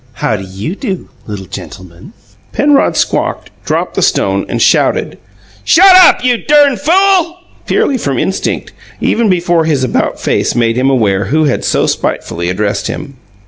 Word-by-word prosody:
"How 110 Hz, -, -2 dB
do 95 Hz, -, -6 dB
you 95 Hz, -, -6 dB
do, 195 Hz, -6 st, -5 dB, 0.2 s
LITTLE 100 Hz, -3 st, -7 dB
GENTLEMAN!" 90 Hz, -, -11 dB, 0.4 s
Penrod 290 Hz, -1 st, +2 dB
squawked, -, -, -2 dB
dropped -, -, -2 dB
the -, -, -2 dB
stone, -, -, 0 dB
and -, -, -2 dB
shouted, -, -, +1 dB, 0.4 s
"Shut 375 Hz, +2 st, +6 dB
up, 365 Hz, -8 st, +6 dB
you 250 Hz, -1 st, +2 dB
dern 290 Hz, 0 st, +3 dB
fool!" 355 Hz, +3 st, +2 dB, 0.3 s
purely 265 Hz, -3 st, 0 dB
from 140 Hz, -, -2 dB
instinct, 190 Hz, -, -3 dB, 0.3 s
even 225 Hz, -2 st, +1 dB
before 175 Hz, -2 st, +1 dB
his 145 Hz, -5 st, 0 dB
about 130 Hz, -, -1 dB
face -, -, -1 dB
made 115 Hz, -1 st, +1 dB
him 130 Hz, +2 st, +1 dB
aware 100 Hz, -7 st, +1 dB
who 155 Hz, +9 st, 0 dB
had 145 Hz, -4 st, -1 dB
so -, -, +1 dB
spitefully 85 Hz, +1 st, -3 dB
addressed 100 Hz, +2 st, -2 dB
him. 140 Hz, -2 st, -7 dB
155 Hz, 155 wpm, -12 LUFS, -, 0.4 s, Shut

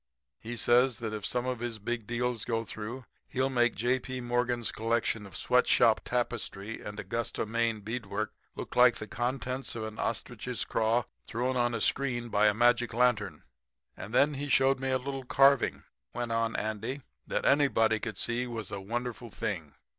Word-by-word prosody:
He 120 Hz, +1 st, -6 dB
says 120 Hz, +2 st, +4 dB
that 110 Hz, -2 st, -4 dB
if 105 Hz, -2 st, -3 dB
some 125 Hz, 0 st, 0 dB
of 130 Hz, -2 st, -2 dB
his 120 Hz, -1 st, -3 dB
big 115 Hz, 0 st, -4 dB
deals 120 Hz, -1 st, -1 dB
go 115 Hz, -1 st, -1 dB
through 115 Hz, +5 st, -6 dB, 0.2 s
he'll 130 Hz, +1 st, 0 dB
make 120 Hz, -2 st, +3 dB
J. 125 Hz, +4 st, +1 dB
P. 130 Hz, 0 st, -5 dB
Morgan's 120 Hz, -1 st, 0 dB
collection 115 Hz, -2 st, 0 dB
of 95 Hz, -, -8 dB
sweatshop 120 Hz, -2 st, +4 dB
tapestry 115 Hz, -3 st, -3 dB
and 105 Hz, 0 st, -7 dB
Augusta, 115 Hz, +4 st, -2 dB
Me., 115 Hz, +1 st, +1 dB
beadwork 110 Hz, 0 st, -4 dB, 0.2 s
look -, -, -6 dB
like 125 Hz, -1 st, +6 dB
the 110 Hz, -, -5 dB
contents 130 Hz, +3 st, -2 dB
of 115 Hz, -, -4 dB
an 110 Hz, 0 st, -6 dB
ostrich's 120 Hz, +2 st, -3 dB
craw 115 Hz, +2 st, +1 dB, 0.2 s
thrown 125 Hz, +3 st, -1 dB
on 120 Hz, -1 st, +1 dB
a -, -, -2 dB
screen 120 Hz, -2 st, 0 dB
by 105 Hz, 0 st, +4 dB
a 105 Hz, -, +4 dB
magic 120 Hz, 0 st, +3 dB
lantern. 105 Hz, -9 st, +1 dB, 0.5 s
"'And 100 Hz, -, -8 dB
then 145 Hz, +5 st, +4 dB
he 145 Hz, +1 st, -4 dB
showed 135 Hz, 0 st, +4 dB
me 135 Hz, 0 st, -2 dB
a 130 Hz, -, +3 dB
little 135 Hz, +1 st, -5 dB
carving,' 135 Hz, +1 st, +4 dB, 0.3 s
went 120 Hz, -1 st, -2 dB
on 115 Hz, 0 st, 0 dB
Andy, 110 Hz, +6 st, -3 dB, 0.2 s
'that -, -, -1 dB
anybody 115 Hz, -6 st, +4 dB
could 110 Hz, -4 st, -5 dB
see 120 Hz, +1 st, 0 dB
was 115 Hz, -4 st, -5 dB
a 100 Hz, -, -4 dB
wonderful 120 Hz, +3 st, -4 dB
thing. 85 Hz, -8 st, -4 dB
120 Hz, 175 wpm, -30 LUFS, 110-125 Hz, 0.5 s, like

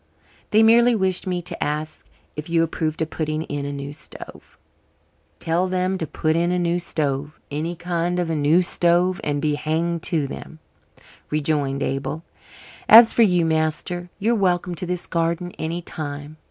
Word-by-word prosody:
"They 220 Hz, +1 st, +5 dB
merely 235 Hz, +2 st, +6 dB
wished 190 Hz, -2 st, -1 dB
me 180 Hz, -1 st, -2 dB
to 175 Hz, 0 st, -4 dB
ask 155 Hz, +1 st, -4 dB
you -, -, -34 dB, 0.2 s
if 150 Hz, +2 st, -6 dB
you 165 Hz, -1 st, +3 dB
approved 160 Hz, -1 st, -2 dB
of 160 Hz, -, -6 dB
putting 155 Hz, 0 st, -2 dB
in 145 Hz, -2 st, -4 dB
a -, -, -3 dB
new 140 Hz, 0 st, -6 dB
stove." 150 Hz, -, -10 dB, 0.8 s
"Tell 170 Hz, -, 0 dB
them 185 Hz, +1 st, -1 dB
to 160 Hz, -, -3 dB
put 155 Hz, +2 st, 0 dB
in 170 Hz, +1 st, +1 dB
a 180 Hz, -, +1 dB
new 175 Hz, 0 st, +1 dB
stove 145 Hz, -3 st, -2 dB
any 160 Hz, +4 st, -3 dB
kind 175 Hz, 0 st, -2 dB
of 175 Hz, -1 st, 0 dB
a -, -, 0 dB
new 155 Hz, +4 st, +3 dB
stove 175 Hz, +1 st, +1 dB
and 145 Hz, -1 st, -1 dB
be 150 Hz, 0 st, 0 dB
hanged 165 Hz, +3 st, -1 dB
to 160 Hz, -5 st, +1 dB
them," 145 Hz, +3 st, -8 dB, 0.7 s
rejoined 145 Hz, -2 st, 0 dB
Abel. 135 Hz, +4 st, -3 dB, 0.7 s
"As 230 Hz, +1 st, +10 dB
for -, -, +3 dB
you, 180 Hz, -6 st, +4 dB
master, 160 Hz, +2 st, -1 dB
you're 220 Hz, +4 st, +1 dB
welcome 180 Hz, -4 st, +1 dB
to 175 Hz, +1 st, -5 dB
this 180 Hz, 0 st, -3 dB
garden 170 Hz, +1 st, -1 dB
any 170 Hz, +2 st, -3 dB
time. 145 Hz, -1 st, -6 dB
165 Hz, 175 wpm, -22 LUFS, 155-180 Hz, 0.8 s, As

